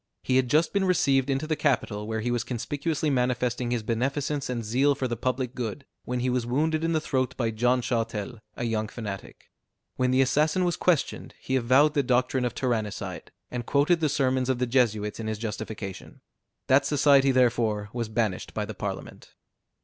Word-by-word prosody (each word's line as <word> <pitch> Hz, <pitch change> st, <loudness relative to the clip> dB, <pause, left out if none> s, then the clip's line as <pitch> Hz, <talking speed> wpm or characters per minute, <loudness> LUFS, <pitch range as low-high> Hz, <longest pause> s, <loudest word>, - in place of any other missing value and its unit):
He 130 Hz, -, +2 dB
had 130 Hz, -2 st, +2 dB
just 155 Hz, +5 st, +3 dB
been 200 Hz, -1 st, +2 dB
received 140 Hz, -7 st, +2 dB
into 135 Hz, +3 st, 0 dB
the 155 Hz, 0 st, 0 dB
capital, 110 Hz, -8 st, 0 dB
where 110 Hz, 0 st, -2 dB
he 120 Hz, +2 st, -1 dB
was 120 Hz, -1 st, 0 dB
conspicuously 145 Hz, +5 st, -2 dB
manifesting 125 Hz, -1 st, 0 dB
his 120 Hz, -2 st, -1 dB
beneficence 135 Hz, +5 st, -1 dB
and 120 Hz, -3 st, -3 dB
zeal 135 Hz, +6 st, +2 dB
for 135 Hz, -1 st, -2 dB
the 120 Hz, -, -2 dB
public 125 Hz, +1 st, -2 dB
good, 125 Hz, +2 st, -5 dB, 0.2 s
when 125 Hz, 0 st, -2 dB
he 130 Hz, -, +1 dB
was 125 Hz, -1 st, 0 dB
wounded 155 Hz, +6 st, 0 dB
in 165 Hz, 0 st, +1 dB
the 160 Hz, -, +2 dB
throat 130 Hz, -4 st, -1 dB
by 115 Hz, -3 st, 0 dB
John 120 Hz, +3 st, +1 dB
Châtel, 115 Hz, -1 st, -2 dB, 0.2 s
a -, -, -4 dB
young 110 Hz, -2 st, -1 dB
fanatic. 105 Hz, -4 st, -8 dB, 0.5 s
When 125 Hz, 0 st, +2 dB
the 130 Hz, +1 st, +4 dB
assassin 150 Hz, +7 st, +2 dB
was 175 Hz, -, +1 dB
questioned, 170 Hz, -6 st, 0 dB
he 130 Hz, -, -2 dB
avowed 130 Hz, +4 st, +4 dB
the 145 Hz, -, +3 dB
doctrine 125 Hz, 0 st, +1 dB
of 120 Hz, -, -3 dB
tyrannicide, 115 Hz, -5 st, -3 dB, 0.2 s
and 120 Hz, -1 st, -4 dB
quoted 150 Hz, +5 st, +3 dB
the 155 Hz, -2 st, +1 dB
sermons 130 Hz, -2 st, +1 dB
of 130 Hz, -, +2 dB
the 125 Hz, -, 0 dB
Jesuits 110 Hz, -5 st, +1 dB
in 110 Hz, -, -4 dB
his 110 Hz, -1 st, -2 dB
justification. 105 Hz, -3 st, -6 dB, 0.4 s
That 135 Hz, +2 st, +4 dB
society 140 Hz, -2 st, +4 dB
therefore 115 Hz, -5 st, +1 dB
was 120 Hz, -2 st, -3 dB
banished 110 Hz, -4 st, -2 dB
by 105 Hz, -, -1 dB
the 110 Hz, -, -6 dB
Parliament. 100 Hz, -1 st, -7 dB
125 Hz, 190 wpm, -26 LUFS, 115-140 Hz, 0.5 s, the